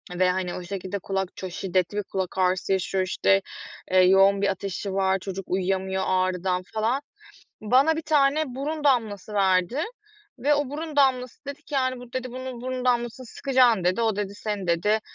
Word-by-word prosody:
ve, 180 Hz, 0 st, +3 dB
hani, 180 Hz, -1 st, -1 dB
o 180 Hz, -, -6 dB
şekilde 195 Hz, +1 st, -5 dB
kulak 190 Hz, -1 st, -2 dB
çok 185 Hz, -2 st, -6 dB
şiddetli 185 Hz, +2 st, -1 dB
bir 205 Hz, -, 0 dB
kulak 190 Hz, -1 st, -4 dB
ağrısı 185 Hz, +1 st, +1 dB
yaşıyor. 190 Hz, 0 st, 0 dB
İşte, 195 Hz, +1 st, +2 dB, 0.5 s
eee, 185 Hz, -, +5 dB
yoğun 195 Hz, +2 st, +5 dB
bir 200 Hz, -, +2 dB
ateşi 195 Hz, 0 st, -4 dB
var. 190 Hz, 0 st, +2 dB
Çocuk 195 Hz, 0 st, -6 dB
uyuyamıyor 190 Hz, 0 st, 0 dB
ağrıdan 185 Hz, 0 st, 0 dB
falan... 225 Hz, +6 st, 0 dB, 0.6 s
Bana 265 Hz, +9 st, +4 dB
1 325 Hz, -, -3 dB
tane 300 Hz, 0 st, +3 dB
burun 290 Hz, +4 st, -4 dB
damlası 220 Hz, -7 st, +1 dB
verdi 195 Hz, -, +2 dB, 0.6 s
ve 290 Hz, +4 st, +3 dB
o 290 Hz, -2 st, -1 dB
burun 305 Hz, +1 st, -5 dB
damlası 260 Hz, -1 st, +1 dB
dedi 280 Hz, 0 st, -7 dB
ki, 295 Hz, -, -12 dB
yani, 255 Hz, -1 st, 0 dB
"Bu," 245 Hz, 0 st, -13 dB
dedi, 255 Hz, -1 st, -4 dB
"bunun 255 Hz, -1 st, -6 dB
burun 255 Hz, 0 st, -4 dB
damlasını 245 Hz, +1 st, 0 dB
sıkacaksın." 245 Hz, -6 st, +2 dB
dedi. 185 Hz, +6 st, +1 dB
"O," 220 Hz, -3 st, +1 dB
dedi, 200 Hz, -1 st, -3 dB
"seni," 205 Hz, -3 st, -4 dB
dedi, 210 Hz, +6 st, +2 dB
205 Hz, 180 wpm, -25 LUFS, 190-255 Hz, 0.6 s, eee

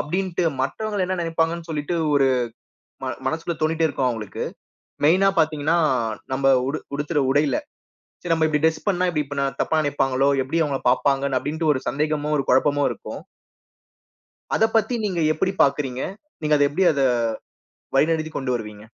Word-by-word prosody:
அப்டின்டு 180 Hz, +2 st, -1 dB, 0.2 s
மத்தவங்க 200 Hz, +9 st, -1 dB
என்ன 185 Hz, 0 st, -1 dB
நினைப்பாங்கன்னு 165 Hz, 0 st, -1 dB
சொல்லிட்டு 155 Hz, +2 st, -2 dB, 0.2 s
ஒரு, 140 Hz, -1 st, +4 dB, 0.8 s
ம -, -, -2 dB, 0.2 s
மனசுகுள்ள 165 Hz, +1 st, -2 dB
தோனிட்டே 160 Hz, +1 st, +2 dB
இருக்கும் 135 Hz, -3 st, -1 dB
அவங்களுக்கு, 110 Hz, -4 st, -4 dB, 0.6 s
மெயினா 185 Hz, +6 st, +5 dB
பாத்தீங்கன்னா, 155 Hz, +1 st, +2 dB, 0.6 s
நம்ம 135 Hz, 0 st, +3 dB, 0.2 s
உடு 155 Hz, -, -2 dB, 0.2 s
உடுத்துற 145 Hz, +1 st, -1 dB
உடையில, 145 Hz, +1 st, +2 dB, 0.6 s
சரி, 175 Hz, -2 st, 0 dB
நம்ம 160 Hz, -1 st, +2 dB
இப்டி 150 Hz, -1 st, 0 dB
டிரெஸ் 160 Hz, -1 st, 0 dB
பண்ணா, 185 Hz, -2 st, +2 dB
இப்டி 150 Hz, -2 st, -1 dB, 0.4 s
தப்பா 160 Hz, -, +1 dB
நினைப்பாங்களோ, 135 Hz, -2 st, +1 dB
எப்டி 165 Hz, +5 st, -1 dB
அவங்கள 140 Hz, -3 st, -2 dB
பாப்பாங்க, 135 Hz, +2 st, +1 dB
அப்டின்டு, 155 Hz, +4 st, -2 dB
ஒரு 130 Hz, -, -3 dB
சந்தேகமும், 150 Hz, +2 st, -1 dB
ஒரு 135 Hz, -, -1 dB
குழப்பமும் 145 Hz, +2 st, +3 dB
இருக்கும். -, -, -8 dB, 1.3 s
அத -, -, +3 dB
பத்தி 225 Hz, +3 st, +2 dB
நீங்க 185 Hz, -5 st, -1 dB
எப்டி 185 Hz, +5 st, 0 dB
பாக்குறீங்க? 135 Hz, -2 st, 0 dB, 0.4 s
நீங்க 150 Hz, 0 st, +3 dB
அத 145 Hz, -, +4 dB
எப்டி 150 Hz, +7 st, -1 dB
அத 140 Hz, -, -1 dB, 0.9 s
வழிநடத்திக் 155 Hz, +2 st, +1 dB
கொண்டு 135 Hz, -2 st, -2 dB
வருவீங்க? 105 Hz, -3 st, -6 dB
150 Hz, 145 wpm, -23 LUFS, 140-165 Hz, 1.3 s, மெயினா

